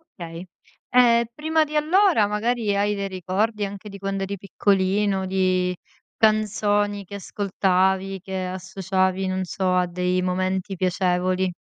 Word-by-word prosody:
Okay. 170 +1 -8 0.5
Ehm, 235 -1 +5
prima 315 +3 +1
di 305 0 -6
allora 320 - +4
magari 210 0 0
hai 205 +1 +1
dei 200 0 -3
ricordi, 195 +3 -1
anche 200 +1 -8
di 200 - -9
quando 195 0 -2
eri 200 +1 -4
piccolino, 195 0 +1
di 185 -1 +1 0.4
canzoni 205 -2 +1
che 200 - -9
ascoltavi 190 -1 0
che 190 0 -4
associavi, 190 0 -1
non 185 0 -1
so, 185 0 -1
a 180 0 +3
dei 180 +1 0
momenti 185 +1 -1
piacevoli? 185 0 0
195 Hz, 135 wpm, -23 LUFS, 185-205 Hz, 0.5 s, Ehm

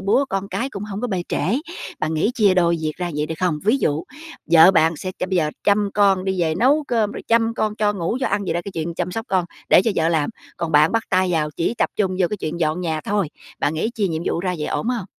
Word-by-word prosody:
búa, 200 +8 +2
con 195 0 -3
cái 265 +3 -3
cũng 200 -2 -6
hông 205 -1 -5
có 245 - -1
bê 185 -6 -2
trễ. 235 +10 0 0.4
Bạn 155 +1 -1
nghĩ 165 +9 +1
chia 205 -5 +4
đôi 170 -2 +3
việc 155 -1 -2
ra 175 -1 -3
vậy, 150 - 0
được 160 - -4
không? 175 -4 +1
Ví 220 +6 +4
dụ 150 - 0 0.5
vợ 170 +2 +8
bạn 165 -3 +3
sẽ 185 - -5 0.2
bây 190 - 0
giờ 155 -3 +1
chăm 205 0 +2
con 195 -2 +3
đi 190 -2 -1
về 160 -2 +1
nấu 280 - +3
cơm, 220 -4 +1
rồi - - -7
chăm 230 0 +2
con 215 0 -1
cho 210 -1 +2
ngủ, 195 +4 -2
cho 265 - +1
ăn 205 0 -1
vậy 165 - -2
đó 175 - 0
cái 200 - -7
chuyện 165 +1 -4
chăm 180 +1 -2
sóc 225 +1 -4
con, 185 -2 +1 0.2
để - - +6
cho 225 - +1
vợ 160 0 +2
làm, 160 0 +1 0.3
còn 165 -2 -3
bạn 150 +5 +5
bắt 225 - +1
tay 185 -1 +2
vào 155 -2 0
chỉ 170 +8 0
tập - - +1
trung 185 -3 0
vô 180 - +4
cái 210 - -2
chuyện 170 -1 -5
dọn 160 +2 0
nhà 160 -3 -2
thôi, 200 -2 -1 0.3
bạn 150 - 0
nghĩ 215 +9 -1
chia 205 -3 0
nhiệm 160 0 -3
vụ 170 - 0
ra 180 -1 -1
vậy 150 - -2
ổn 225 - -2
hông? 240 -6 -1
185 Hz, 280 wpm, -21 LUFS, 165-210 Hz, 0.5 s, vợ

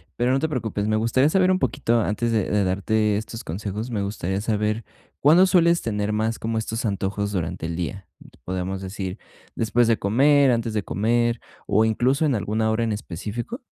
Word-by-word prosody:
pero 125 +1 +1
no 135 - +2
te 160 - -1
preocupes, 110 -6 -2
me 110 - +1
gustaría 115 +6 +2
saber 185 +1 +3
un 185 - +2
poquito 120 -4 +1
antes 115 +3 -1
de 110 -4 0
de 105 -1 +2
darte 105 +3 +1
estos 110 +2 -6
consejos, 105 +7 -5
me 105 -3 -1
gustaría 100 -1 -2
saber, 105 0 -1 0.4
¿cuándo 165 +6 +6
sueles 170 -2 +3
tener 105 -2 -1
más 110 +1 -1
como 115 0 -2
estos 110 +1 -3
antojos 100 +1 -2
durante 85 -2 -3
el 85 - -4
día?, 90 +1 -5 0.4
¿podemos 95 +1 -3
decir, 95 +1 -5 0.3
después 115 +1 +1
de 115 - +2
comer, 135 +6 +4
antes 115 -2 0
de 105 - 0
comer 120 +3 +1 0.3
o 110 +2 +3
incluso 130 +7 +1
en 140 - +2
alguna 110 +1 0
hora 115 +1 0
en 110 -2 0
específico? 105 - -5
110 Hz, 190 wpm, -23 LUFS, 100-120 Hz, 0.4 s, cuándo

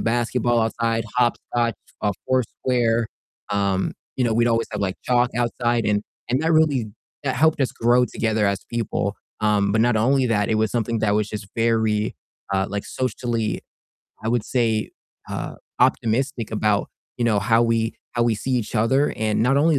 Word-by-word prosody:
basketball 120 0 +1
outside, 115 0 0
hopscotch, 120 -1 +1 0.3
uh, 105 - +2 0.2
foursquare. 120 -2 +1 0.4
Um, 100 -2 0 0.2
you 130 - +1
know, 115 - +2
we'd 120 +1 +3
always 115 0 +1
have 105 - -3
like 95 -2 -1
chalk 125 -1 +3
outside 120 -1 0
and 105 0 +2 0.3
and 130 +5 +1
that 165 +1 +2
really, 150 -7 +3 0.4
that 130 - 0
helped 155 +2 +3
us 130 - +2
grow 120 +2 +3
together 110 -1 0
as 100 -1 0
people. 110 -3 -1 0.3
Um, 105 -2 +2
but 110 - +3
not 120 0 +3
only 130 +4 +3
that, 105 -3 +1
it 110 - +2
was 110 -1 +1
something 115 -1 0
that 105 -1 +2
was 105 0 +1
just 105 -2 -6
very, 110 -2 +1 0.4
uh, 95 0 +1
like 100 0 -3
socially, 120 -3 -2 0.6
I 110 - -2
would 120 -1 +1
say, 115 -4 0 0.4
uh, - - -5 0.2
optimistic 120 +1 +1
about, 105 -1 +1 0.3
you 120 - +1
know, 105 -3 +3
how 115 +2 +3
we 115 -1 +1 0.2
how 120 - +1
we 115 -2 +2
see 130 +5 -3
each 120 -4 -1
other, 130 +7 +2
and 110 0 +1
not 135 +4 +3
only 155 0 +4
115 Hz, 175 wpm, -23 LUFS, 110-120 Hz, 0.6 s, only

